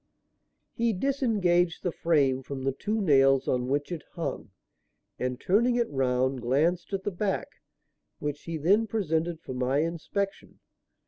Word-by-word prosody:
He 230 -1 +1
disengaged 190 -8 +1
the 180 - 0
frame 140 -6 +2
from 135 0 -6
the 135 - +1
two 210 +11 -2
nails 135 -7 +4
on 125 -1 0
which 145 +5 -1
it 170 -3 -4
hung, 170 - -4 0.7
and, 125 0 -2
turning 235 - +2
it 240 -1 +1
round, 130 -1 +1
glanced 155 - +1
at 195 -1 -2
the 205 - -1
back; 195 +2 -3 0.6
which 145 0 -4
he 165 -1 -3
then 200 +9 +3
presented 170 -6 -1
for 130 - -7
my 130 +3 +1
inspection. 185 +4 -4
165 Hz, 145 wpm, -28 LUFS, 135-195 Hz, 0.7 s, nails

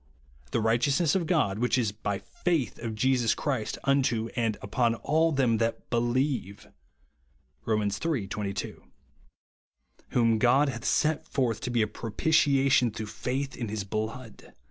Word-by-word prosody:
The - - 0
righteousness 135 +8 +2
of 180 -4 0
God 125 - +1
which 125 +2 +2
is 115 -5 +1
by 100 0 -3
faith 135 - -2
of 115 -2 -4
Jesus 125 0 +2
Christ 130 -7 -2
unto 130 -5 +1
all - - -15
and 115 -3 0
upon 115 +3 0
all 160 +7 +1
them 130 -6 +2
that 115 0 -2
believe; 120 -3 -1 1.0
(Rom. 110 -1 +1
iii. 105 +3 -1
22). 100 -2 -5 1.3
"Whom 115 -2 +2
God 130 +5 +4
hath 120 -2 -6
set 155 +1 +1
forth 120 -5 -1
to 125 - -3
be 120 -2 +2
a - - 0
propitiation 135 +2 +2
through 110 0 -6
faith 135 +2 -3
in 115 - -4
his 105 -1 -3
blood 110 +4 -6
120 Hz, 145 wpm, -28 LUFS, 110-135 Hz, 1.3 s, God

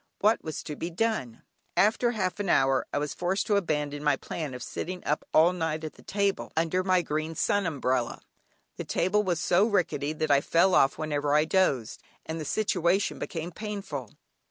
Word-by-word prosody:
What 215 +2 +2
was 155 - -5
to 150 - -6
be 165 - -4
done? 175 - -2 0.3
After 220 +4 +3
half 190 -2 -2
an 200 -3 -2
hour, 135 -4 +3
I - - -1
was 145 0 -2
forced 180 +3 -1
to 210 - +2
abandon 150 -6 -1
my 145 -2 +3
plan 145 -1 -5
of 125 - -7
sitting 180 +8 -5
up 150 - 0
all 165 +3 +5
night 160 -3 -2
on 155 - -5
the - - -17
table, 200 -1 -1
under 170 +3 +1
my 185 -1 +3
green 155 +1 -3
sun 205 +3 +1
umbrella; 130 -5 -1 0.6
the - - -4
table 200 +4 +1
was 180 -5 -1
so 185 +6 +3
rickety 160 -8 0
that 155 -1 -1
I 140 0 +5
fell 170 +5 +3
off 135 -4 +4
whenever 145 -2 0
I 150 +1 +4
dozed, 150 - +1 0.2
and 160 0 -4
the - - -5
situation 190 +1 +1
became 165 +1 -4
painful. 195 - -5
165 Hz, 190 wpm, -28 LUFS, 150-190 Hz, 0.6 s, all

